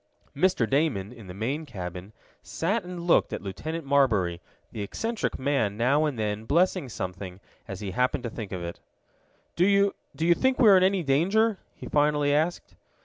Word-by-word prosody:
Mr. 155 -6 +2
Damon, 125 -6 0
in 115 -5 -13
the 90 - -8
main 130 +10 -2
cabin, 90 - -7 0.3
sat 200 +6 -2
and 180 -1 -7
looked 170 0 +3
at - - -5
Lieutenant 155 - -5
Marbury, 110 -12 +2 0.3
the 110 - -6
eccentric 225 - -3
man 130 -7 0
now 140 +6 +3
and 145 -5 -2
then 105 0 -2
blessing 165 -2 +1
something 95 -2 -6 0.3
as 95 0 -7
he 100 -2 -4
happened 125 +5 0
to 115 - -4
think 110 -4 -7
of 90 -2 -4
it. 85 0 -6 0.8
"Do 175 - +2
you 200 +1 +4 0.2
do 160 - -1
you 170 - +6
think 260 +8 +1
we 235 -5 +6
are 195 - +8
in - - +4
any 190 -1 +2
danger?" 190 +9 +2 0.2
he - - -10
finally 145 -1 +2
asked. 160 +4 -1
140 Hz, 185 wpm, -26 LUFS, 105-175 Hz, 0.8 s, are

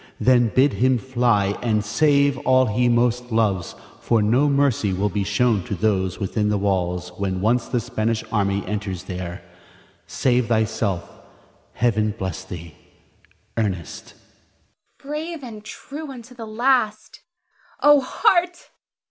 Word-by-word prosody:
Then 120 -2 +4
bid 130 +5 +3
him 130 0 +4
fly, 120 -5 +1
and 110 -3 0
save 140 +5 +2
all 130 0 +3
he 120 +2 +1
most 120 +1 +1
loves, 105 -6 0 0.2
for 115 - +1
no 120 +8 +3
mercy 140 -8 +1
will 100 +3 0
be 100 -1 -1
shown 105 0 +1
to 100 - -3
those 95 -2 0
within 105 +2 -1
the 105 - +1
walls 90 -3 -1
when 95 -2 -1
once 115 +5 +1
the 125 - 0
Spanish 115 -1 -2
army 100 -2 0
enters 100 -3 -4
there. 90 -1 -6 0.6
Save 125 -2 +1
thyself. 110 -5 0 0.7
Heaven 110 -3 +1
bless 95 -2 -4
thee. 85 -4 -9 0.8
Ernest. 95 -7 -4 0.8
Brave 305 +2 -6
and 220 -4 -9
true 290 +7 -8
unto 250 -1 -11
the 230 -2 -9
last! 220 -1 0 0.6
O 290 -1 +6
heart! 350 - +1
115 Hz, 130 wpm, -22 LUFS, 100-140 Hz, 0.8 s, O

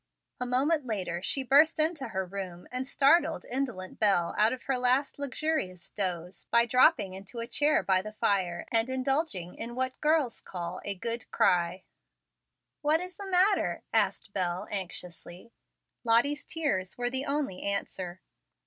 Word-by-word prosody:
A 250 - -1
moment 270 +3 +2
later 185 -6 -3
she 270 +7 +3
burst 290 +5 +5
into 310 -3 +1
her 190 0 -3
room 185 -2 -7
and 255 +1 -2
startled 285 +6 +3
indolent 245 -8 -4
Bel 195 -5 +2
out 215 +2 +4
of 255 - -5
her 270 - 0
last 255 +3 +2
luxurious 280 - -2
doze 180 -3 -3
by 235 0 +4
dropping 235 - +4
into 195 +5 -9
a 230 - -3
chair 295 +5 +2
by 190 -1 +2
the 215 +2 -8
fire 185 -5 0
and 225 +2 +3
indulging 260 - -1
in 235 +1 -7
what 260 0 -2
girls 300 -5 +1
call 175 0 -6
a 200 - -3
"good 230 +4 -4
cry." 180 +1 +1 1.0
"What 305 +2 +2
is 365 0 -8
the 400 -1 -8
matter?" 380 +2 +2
asked 200 - +1
Bel, 185 +1 -2
anxiously. 180 +1 -6 0.5
Lottie's 255 +6 +3
tears 205 - -2
were 245 0 -1
the 265 +1 0
only 280 -9 -2
answer. 185 -2 -3
235 Hz, 155 wpm, -29 LUFS, 185-280 Hz, 1.0 s, burst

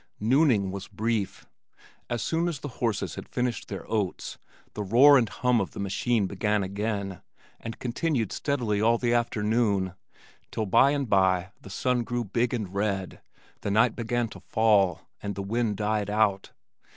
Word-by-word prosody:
Nooning 115 -4 +3
was 95 0 -6
brief. 110 -1 -2 0.6
As 120 -1 -2
soon 165 +1 0
as 170 -4 -2
the - - -4
horses 115 -4 -1
had - - -8
finished 125 -1 -2
their - - -7
oats, 105 -5 -2 0.3
the 105 - -4
roar 125 +9 +7
and 120 -5 +3
hum 120 +5 +1
of 95 - -4
the - - -8
machine 100 +3 0
began 105 +2 0
again 100 -1 -3 0.4
and 115 - -7
continued 125 - -1
steadily 120 -8 -1
all 115 +2 +4
the 120 0 0
afternoon, 110 -5 +1 0.6
till 110 - -2
by 115 +7 +5
and 140 -2 -1
by 95 -2 +2
the - - -11
sun 125 +5 0
grew 120 +1 -2
big 115 +4 0
and 105 -7 -3
red, 100 -2 -2 0.4
the - - -2
night 110 +3 +3
began 120 0 -1
to - - -11
fall, 105 -6 +2 0.2
and 100 -1 -4
the 100 - -4
wind 110 0 -1
died 105 -1 -1
out. 105 -2 +1
110 Hz, 165 wpm, -27 LUFS, 100-120 Hz, 0.6 s, roar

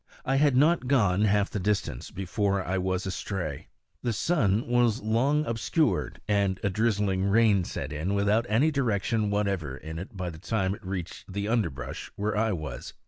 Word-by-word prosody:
I 135 +1 +2
had 145 -2 +4
not 155 -1 +3
gone 105 -7 +3
half 105 -1 +2
the 105 - -2
distance 95 -10 -1
before 95 +1 -1
I 95 +1 -1
was 95 +1 -1
astray. 90 -5 -4 0.3
The 120 -2 -1
sun 110 - +1
was 120 -2 +3
long 130 +8 +2
obscured, 115 +7 0
and 100 -3 +1
a 100 - +1
drizzling 100 -3 +1
rain 100 -2 +4
set 70 -3 -5
in, 85 +7 -1
without 105 +4 +2
any 130 +9 +3
direction 110 -5 0
whatever 100 -9 -1
in 80 +2 -7
it 95 +2 -8
by 90 -2 -3
the 80 - -11
time 95 0 0
it 110 +2 -10
reached 95 0 -6
the 100 +2 -2
underbrush 85 - -2
where 105 +1 -1
I 110 +1 +2
was. 75 -9 -5
100 Hz, 175 wpm, -27 LUFS, 95-115 Hz, 0.3 s, had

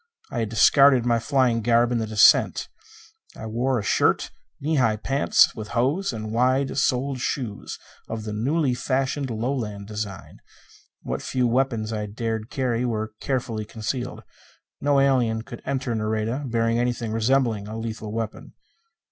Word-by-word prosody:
I 120 - -2
had 110 -2 -1
discarded 130 +3 +5
my 120 -1 +2
flying 125 -2 +1
garb 120 +1 +3
in 120 - +1
the 110 - -2
descent. 105 0 +4 0.7
I 110 - -7
wore 120 +4 0
a 110 - -2
shirt, - - +2 0.3
knee 150 +1 0
length 110 -3 +1
pants, 135 +1 +3
with 110 -2 -7
hose 145 +11 +1
and 110 -2 -5
wide 130 +4 +1
soled 130 +1 0
shoes 120 -5 -4 0.3
of 110 -1 -4
the 105 -1 -5
newly 135 +5 +1
fashioned 135 +2 -1
Lowland 110 -3 -3
design. 105 -2 -6 0.6
What - - -3
few 125 -1 0
weapons 115 -3 0
I 105 -1 -3
dared 110 +1 -4
carry 125 -3 -1
were 110 -3 -2
carefully 120 -5 -2
concealed. 115 +4 -5 0.6
No 140 -1 +3
alien 125 -5 +2
could 120 - -10
enter 130 -3 -2
Nareda 110 +5 -2
bearing 115 0 +1
anything 120 -2 -1
resembling 115 -2 +1
a 110 +1 -6
lethal 110 -1 -5
weapon. 110 0 -5
115 Hz, 150 wpm, -24 LUFS, 110-130 Hz, 0.7 s, discarded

